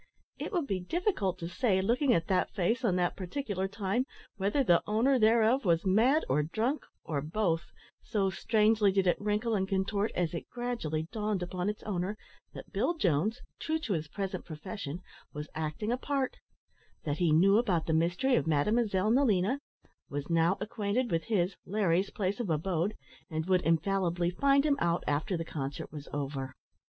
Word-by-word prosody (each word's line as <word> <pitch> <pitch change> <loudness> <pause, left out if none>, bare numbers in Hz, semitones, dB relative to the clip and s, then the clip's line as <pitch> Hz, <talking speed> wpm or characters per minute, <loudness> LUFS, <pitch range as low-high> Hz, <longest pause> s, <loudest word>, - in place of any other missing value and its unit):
It - - -4
would 350 -7 0
be 195 -8 -1
difficult 205 - -1
to 170 -2 -5
say, 190 +1 +1
looking 245 +8 +2
at 165 -8 +2
that 185 0 +1
face 225 +7 +1
at 200 -7 +2
that 180 -1 +1
particular 195 -1 -3
time, 205 +6 -1 0.3
whether 205 +7 +1
the 175 -8 +4
owner 240 +5 +3
thereof 225 +4 +4
was 170 -2 +2
mad 235 +11 +4
or 145 +3 +2
drunk 220 - -1 0.2
or 150 -4 -2
both 165 +1 0 0.4
so 200 -4 0
strangely 215 +1 +3
did 190 0 +2
it 175 - +2
wrinkle 210 +2 0
and 190 -2 +1
contort 200 +2 0
as 175 -2 0
it 170 - -5
gradually 235 -11 -2
dawned 210 -4 -1
upon 180 +2 -2
its 210 - -5
owner 195 +1 -2 0.4
that - - -10
Bill 345 - +1
Jones, 205 - +1 0.2
true 320 0 0
to 255 -10 -2
his 160 -3 -2
present 190 +3 -4
profession, 165 0 -6 0.3
was 150 0 -6
acting 160 +8 -3
a 245 - +1
part; 275 -1 -2 0.7
that 145 -1 -2
he 175 -3 +3
knew 195 +7 +5
about 185 -9 +1
the 160 - 0
mystery 175 +11 +2
of - - +1
Mademoiselle 205 +6 +2
Nelina; 240 -1 +3 0.5
was 145 +3 -4
now 165 +3 +3
acquainted 215 +3 -1
with 165 -1 0
his, 190 -4 +1
(Larry's), 195 -1 +1
place 200 +1 -2
of 235 -6 -2
abode; 170 +5 0 0.3
and 160 -1 -2
would 185 -1 +3
infallibly 175 +1 +1
find 275 +8 +3
him 285 -2 +3
out 170 0 +1
after 155 +6 0
the 165 - -4
concert 140 -3 -5
was 145 -1 -8
over. 135 -2 -4
195 Hz, 175 wpm, -30 LUFS, 170-225 Hz, 0.7 s, knew